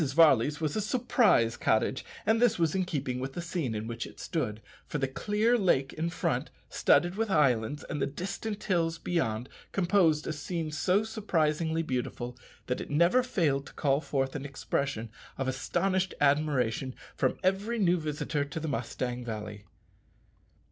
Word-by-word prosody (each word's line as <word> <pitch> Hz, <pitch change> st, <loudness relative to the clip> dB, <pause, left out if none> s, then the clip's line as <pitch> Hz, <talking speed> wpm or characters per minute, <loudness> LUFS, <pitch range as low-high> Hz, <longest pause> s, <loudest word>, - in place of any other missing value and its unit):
Varley's 150 Hz, -3 st, +5 dB
was 155 Hz, -2 st, -1 dB
a 215 Hz, -, +1 dB
surprise 215 Hz, -, +3 dB
cottage; 110 Hz, +4 st, +1 dB, 0.2 s
and 220 Hz, +2 st, +3 dB
this 245 Hz, -3 st, +4 dB
was 165 Hz, -3 st, +2 dB
in 190 Hz, -1 st, +1 dB
keeping 135 Hz, -7 st, -2 dB
with 135 Hz, +1 st, -4 dB
the -, -, -5 dB
scene 165 Hz, -9 st, -2 dB
in 105 Hz, +1 st, -3 dB
which 115 Hz, +1 st, -4 dB
it -, -, -14 dB
stood, 120 Hz, -11 st, -2 dB, 0.3 s
for -, -, -2 dB
the 135 Hz, -1 st, 0 dB
clear 210 Hz, -, +1 dB
lake 140 Hz, -9 st, +2 dB
in 165 Hz, +2 st, -2 dB
front, 170 Hz, -, -1 dB, 0.2 s
studded 175 Hz, 0 st, +3 dB
with 225 Hz, -1 st, 0 dB
islands, 140 Hz, -, +2 dB
and 150 Hz, -, -3 dB
the -, -, +2 dB
distant 200 Hz, +7 st, -5 dB
hills 165 Hz, -4 st, +1 dB
beyond, 125 Hz, -10 st, -1 dB, 0.2 s
composed 175 Hz, -5 st, +3 dB
a 155 Hz, -, -2 dB
scene 155 Hz, +1 st, -3 dB
so 185 Hz, +6 st, +2 dB
surprisingly 165 Hz, -7 st, 0 dB
beautiful 125 Hz, -3 st, -3 dB, 0.3 s
that 125 Hz, -, -2 dB
it -, -, -7 dB
never 170 Hz, +11 st, +4 dB
failed 160 Hz, -, 0 dB
to -, -, -12 dB
call 140 Hz, -1 st, +1 dB
forth 135 Hz, -3 st, -1 dB
an 140 Hz, -, -3 dB
expression 135 Hz, -4 st, -2 dB, 0.3 s
of 135 Hz, -, -2 dB
astonished 185 Hz, +8 st, 0 dB
admiration 140 Hz, -4 st, +1 dB, 0.2 s
from 130 Hz, -, +1 dB
every 195 Hz, +5 st, +1 dB
new 180 Hz, -4 st, +3 dB
visitor 150 Hz, -1 st, -2 dB
to 140 Hz, +3 st, -5 dB
the 160 Hz, -, -4 dB
Mustang 125 Hz, -1 st, -3 dB
Valley. 105 Hz, -2 st, -6 dB
150 Hz, 165 wpm, -29 LUFS, 130-180 Hz, 0.3 s, Varley's